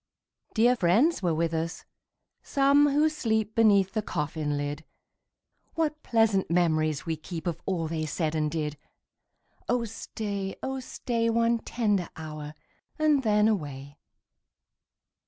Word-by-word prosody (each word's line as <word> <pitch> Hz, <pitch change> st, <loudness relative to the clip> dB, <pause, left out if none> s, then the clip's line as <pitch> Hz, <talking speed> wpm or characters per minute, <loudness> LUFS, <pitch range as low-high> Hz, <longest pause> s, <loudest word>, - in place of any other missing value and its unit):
Dear 240 Hz, +2 st, +5 dB
friends 230 Hz, -, +3 dB
were 170 Hz, -4 st, +1 dB
with 165 Hz, +1 st, 0 dB
us, 165 Hz, +1 st, -3 dB, 0.6 s
some 280 Hz, +1 st, +4 dB
who 295 Hz, +2 st, +3 dB
sleep 220 Hz, -8 st, -1 dB
Beneath 200 Hz, -4 st, +4 dB
the 215 Hz, -, -1 dB
coffin 150 Hz, -5 st, -2 dB
lid: 145 Hz, 0 st, -4 dB, 0.9 s
What 305 Hz, -2 st, -1 dB
pleasant 225 Hz, -5 st, +2 dB
memories 155 Hz, -4 st, +1 dB
we 165 Hz, -, -1 dB
keep 160 Hz, +2 st, -7 dB
Of 170 Hz, -3 st, -3 dB
all 175 Hz, -4 st, -1 dB
they 155 Hz, -1 st, -2 dB
said 155 Hz, +1 st, -1 dB
and 155 Hz, -1 st, 0 dB
did! 150 Hz, -2 st, -3 dB, 0.9 s
Oh 245 Hz, -1 st, +1 dB
stay, 200 Hz, -3 st, -5 dB
oh 265 Hz, 0 st, -2 dB
stay, 235 Hz, -2 st, -2 dB
One 230 Hz, 0 st, +2 dB
tender 210 Hz, -7 st, -1 dB
hour, 155 Hz, -1 st, -7 dB, 0.4 s
and 305 Hz, -3 st, +3 dB
then 210 Hz, -3 st, +3 dB
away. 145 Hz, -8 st, -3 dB
195 Hz, 130 wpm, -27 LUFS, 155-230 Hz, 0.9 s, Dear